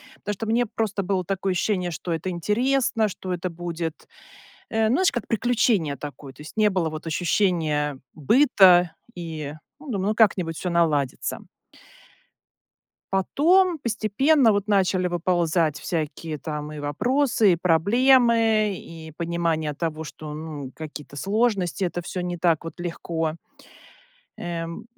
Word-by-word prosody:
потому 210 - -4
что 225 +3 -5
мне 235 +2 +2
просто 210 -2 -2
было 185 -1 0
такое 195 +1 -1
ощущение, 180 -1 0
что 170 +2 -5
это 165 +3 -3
интересно, 225 +5 +1
что 185 0 -5
это 180 +1 -3
будет, 170 -1 -5 0.6
э, 220 -1 +1
знаешь, 340 +11 +3
как 240 - -3
приключение 225 - +1
такое, 140 -2 -9
то 145 - -13
есть 155 - -12
не 210 -1 +4
было 175 -4 0
вот 155 +2 -7
ощущения 155 -5 0 0.2
быта, 180 - +5 0.2
и, 160 -4 -6 0.3
ну, 295 -3 -9
думаю, 195 -2 -1
ну, - - 0
как-нибудь 185 -7 +2
всё 180 - -3
наладится. 150 -6 0 1.7
Потом 335 - +3
постепенно 235 +4 +3
вот 205 0 -1
начали 190 -2 +2
выползать 170 -3 +1
всякие 155 -1 -3
там 150 -1 -5
и 150 - -7
вопросы, 225 - +2
и - - +2
проблемы, 220 +4 +3
и 160 -2 -10
понимание 165 -3 -1
того, 160 0 -3
что, 150 0 -8
ну, 150 -4 -7
какие-то 150 -2 -9
сложности, 200 - 0
это 175 -1 -2
всё 180 +1 -5
не 175 0 -3
так 165 -2 +2
вот 165 - -8
легко. 165 -2 -3 1.0
Эм. 170 -1 -5
180 Hz, 135 wpm, -24 LUFS, 160-215 Hz, 1.7 s, быта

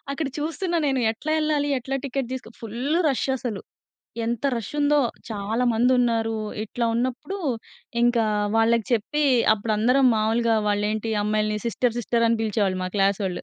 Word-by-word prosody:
అక్కడ 295 +2 -2
చూస్తున్నా 330 +4 -2
నేను 270 -2 +1
ఎట్లా 310 +7 -4
వెళ్ళాలి? 300 -2 +1
ఎట్లా 270 +2 -3
టికెట్ 270 -2 -2
తీసుకొ 255 -3 -6
ఫుల్ 240 +8 -2
రష్ 270 - 0
అసలు. 235 -6 -4 0.6
ఎంత 235 +3 -3
రష్ 230 -4 -4
ఉందో! 295 0 +3 0.3
చాలామందున్నారు. 230 +1 +1 0.3
ఇట్లా 235 +2 -3
ఉన్నప్పుడు 255 +11 -2 0.7
ఇంకా 240 -2 +3 0.3
వాళ్ళకి 225 0 +3
చెప్పి, 295 +7 0 0.3
అప్పుడు 220 +1 -1
అందరం 255 +4 +4
మామూలుగా 225 +1 +2
వాళ్ళ 205 0 +1
ఏంటి 220 +1 -3
అమ్మాయిల్ని 215 0 0
సిస్టర్, 235 0 0
సిస్టర్ 235 0 +1
అని 230 0 +2
పిలిచేవాళ్ళు 205 -4 0
మా 185 - -2
క్లాసోళ్లు. 195 -1 0
235 Hz, 145 wpm, -24 LUFS, 220-265 Hz, 0.7 s, అందరం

